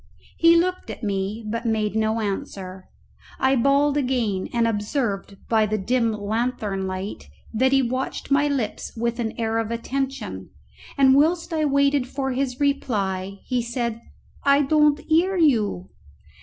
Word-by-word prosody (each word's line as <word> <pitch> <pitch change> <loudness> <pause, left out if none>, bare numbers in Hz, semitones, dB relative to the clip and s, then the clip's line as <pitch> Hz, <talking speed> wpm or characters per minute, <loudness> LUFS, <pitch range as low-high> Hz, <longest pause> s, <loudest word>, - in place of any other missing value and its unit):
He 335 0 +6
looked 365 +2 0
at - - -7
me, 200 +2 -2
but 230 +2 -3
made 215 -2 0
no 220 +1 +1
answer. 190 -2 -5 0.5
I 265 +1 +3
bawled 275 +3 +3
again, 245 -8 0
and 235 -1 +2
observed 205 -2 -2
(by 220 -2 +3
the 215 +1 -1
dim 230 +3 +1
lanthorn 210 -2 -2
light) 185 - -6 0.2
that 260 +4 +2
he 270 -1 +4
watched 255 +3 -3
my 285 +1 +4
lips 265 -7 -2
with 235 +1 -1
an 230 0 -3
air 225 0 0
of 225 -1 -2
attention; 270 +3 -4 0.5
and 265 -1 +6
whilst 330 +5 +2
I 310 -1 +1
waited 280 -2 +2
for 265 +1 -3
his 255 -1 -2
reply 200 -9 -1
he 250 -2 0
said, 235 -1 -3 0.4
"I 280 +1 +4
don't 300 +1 +3
hear 350 +5 +2
you." 220 - +1
235 Hz, 150 wpm, -23 LUFS, 215-275 Hz, 0.5 s, He